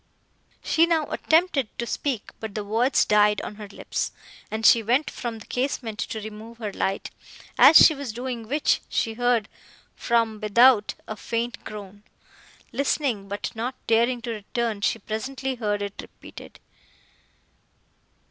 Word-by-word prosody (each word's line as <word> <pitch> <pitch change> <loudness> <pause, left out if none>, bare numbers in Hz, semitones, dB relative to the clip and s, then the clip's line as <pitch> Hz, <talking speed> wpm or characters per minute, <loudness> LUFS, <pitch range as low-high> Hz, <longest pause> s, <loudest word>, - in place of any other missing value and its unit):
She 330 +1 +3
now 325 -3 +1
attempted 315 -6 +2
to 235 - -2
speak, 250 -2 -3
but 220 -3 -7
the 210 - -2
words 230 +6 +2
died 210 -1 +4
on 210 - -7
her 210 -1 -8
lips, 200 - -4 0.4
and 220 +1 -3
she 230 - +7
went 245 +7 +1
from 235 -2 -5
the 220 - -12
casement 245 -4 -3
to 220 - -3
remove 215 +2 -9
her 215 -4 -5
light; 195 +1 -2 0.4
as 320 - +9
she 315 - +8
was 280 -5 -5
doing 240 -1 -5
which, 290 +5 +1
she 225 - -1
heard, 240 -2 +1 0.5
from 230 -2 0
without, 215 +1 +4
a 215 - -5
faint 235 +2 -4
groan. 205 -1 -9 0.7
Listening, 265 -7 -1
but 200 +1 -4
not 240 +3 -4
daring 235 +2 +2
to 235 - -3
return, 220 0 -3
she 215 - +1
presently 260 +5 -4
heard 210 -4 -2
it 200 -1 -5
repeated. - - -13
230 Hz, 150 wpm, -25 LUFS, 210-255 Hz, 0.7 s, as